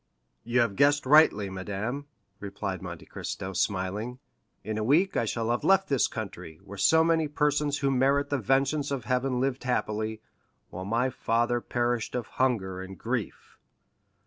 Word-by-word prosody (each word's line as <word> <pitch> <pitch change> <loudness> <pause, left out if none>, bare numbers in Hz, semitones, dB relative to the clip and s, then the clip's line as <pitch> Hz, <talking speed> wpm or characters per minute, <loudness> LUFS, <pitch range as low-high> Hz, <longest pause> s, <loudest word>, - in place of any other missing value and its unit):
"You 120 +2 +2
have 110 -4 0
guessed 145 0 +4
rightly, 135 -8 +5
madame," 105 +9 -4 0.3
replied 100 -1 -5
Monte - - -8
Cristo, 95 +1 -6
smiling; 100 +6 -2 0.5
"in 110 +1 -3
a - - -1
week 160 - +3
I 115 - +1
shall 115 +1 -1
have 120 - -1
left 195 0 +3
this 135 -3 +3
country, 90 -7 -7
where 100 - -10
so 160 0 +5
many 165 -1 +2
persons 150 -1 +1
who 140 -1 +1
merit 140 +2 +2
the 145 - +1
vengeance 135 +5 +1
of 135 -5 -3
Heaven 125 0 0
lived 135 0 -1
happily, 110 -3 -1 0.5
while 95 +2 -6
my 120 +5 +1
father 120 +1 0
perished 120 -1 -1
of 120 -3 -2 0.2
hunger 95 -8 0
and 95 0 -9
grief." - - -4
120 Hz, 160 wpm, -28 LUFS, 105-140 Hz, 0.5 s, rightly